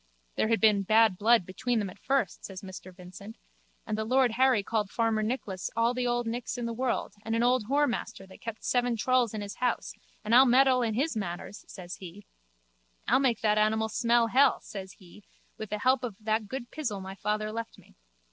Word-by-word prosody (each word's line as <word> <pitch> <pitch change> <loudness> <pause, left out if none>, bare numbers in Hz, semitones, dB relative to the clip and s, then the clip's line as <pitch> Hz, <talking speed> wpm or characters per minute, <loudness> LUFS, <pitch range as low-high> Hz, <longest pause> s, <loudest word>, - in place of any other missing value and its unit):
There - - +1
was 225 0 +2 0.3
bad 220 -2 +5
blood 225 -2 +4
between 240 +6 -2
them 200 -4 -2
at - - -17
first, 275 +1 -1
says 190 0 -8
Mr 190 0 -9
Vincent, 185 +4 -12 0.5
and 215 - -2
the 220 - -2
lord 255 +2 +3
Harry 250 -2 +3
called 210 -1 -1
farmer 225 -1 0
Nicholas 215 -5 -3
all 230 +1 +2
the 250 0 -1
old 240 0 0
Nicks 240 +2 -4
in 240 - -3
the 235 - -3
world 250 +1 -2
and 225 0 -2
an 230 - +1
old 250 -2 +2
whoremaster 275 -7 -1
that 190 - -15
kept 230 -1 -7
seven 245 -1 +1
trulls 245 -1 +1
in 210 - -4
his 205 0 -7
house 250 -1 -1 0.3
and 215 - 0
I'll 260 +2 +8
meddle 255 +1 +4
in 225 -3 -1
his 280 +3 0
matters, 195 0 -6
says 180 -2 -9
he. 190 +2 -11 0.8
I'll 255 +4 +4
make 255 -5 +1
that 215 -1 +2
animal 220 +1 +1
smell 235 +2 +2
hell, 260 +5 +4
says 195 -3 -8
he, 190 +2 -17 0.4
with 220 - -6
the 210 - -2
help 255 +4 +2
of 230 -5 -4
that 215 0 -1
good 250 +1 -6
pizzle 240 -10 -3
my 190 0 -7
father 215 +2 -2
left 230 +1 -6
me. - - -20
225 Hz, 205 wpm, -28 LUFS, 210-245 Hz, 0.8 s, I'll